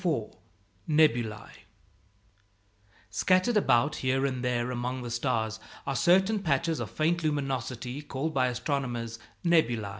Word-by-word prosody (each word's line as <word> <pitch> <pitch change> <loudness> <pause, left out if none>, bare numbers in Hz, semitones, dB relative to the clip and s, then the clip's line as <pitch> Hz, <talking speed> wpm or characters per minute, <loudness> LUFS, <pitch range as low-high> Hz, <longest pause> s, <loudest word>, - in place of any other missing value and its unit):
] 95 0 -25
NEBULÆ 120 -8 +2 1.6
Scattered 185 - +2
about 145 - +3
here 130 +1 +1
and 130 -2 -2
there 125 0 0
among 125 +1 -3
the 120 - -5
stars 110 -1 -1 0.3
are 140 - -2
certain 190 - +4
patches 160 0 0
of - - -4
faint 170 +2 0
luminosity 135 -3 -2
called 145 +2 -3
by 130 -2 +2
astronomers 120 -2 -3 0.3
Nebulæ. 120 -12 +2
130 Hz, 120 wpm, -28 LUFS, 120-155 Hz, 1.6 s, certain